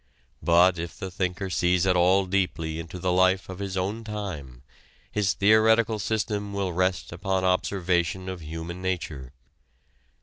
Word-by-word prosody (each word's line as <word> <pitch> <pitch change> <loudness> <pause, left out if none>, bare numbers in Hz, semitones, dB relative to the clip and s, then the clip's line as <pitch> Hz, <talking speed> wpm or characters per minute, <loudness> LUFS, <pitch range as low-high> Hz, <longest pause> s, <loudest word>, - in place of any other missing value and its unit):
But 85 +1 +4
if 85 0 -6
the 95 - -6
thinker 90 +1 -2
sees 90 +1 +2
at 95 -1 +3
all 95 +2 +4
deeply 90 -4 -1
into 85 +2 -7
the 90 0 -1
life 95 +1 +3
of 95 0 -7
his 95 -1 -4
own 100 +5 -2
time, 90 - -6 0.5
his 100 -3 +1
theoretical 110 +1 +4
system 105 -1 -2
will 100 -3 -2
rest 90 +1 0
upon 95 +2 -1
observation 90 -1 0
of 95 -2 -5
human 80 +3 -6
nature. 80 -8 -3
95 Hz, 145 wpm, -26 LUFS, 85-100 Hz, 0.5 s, But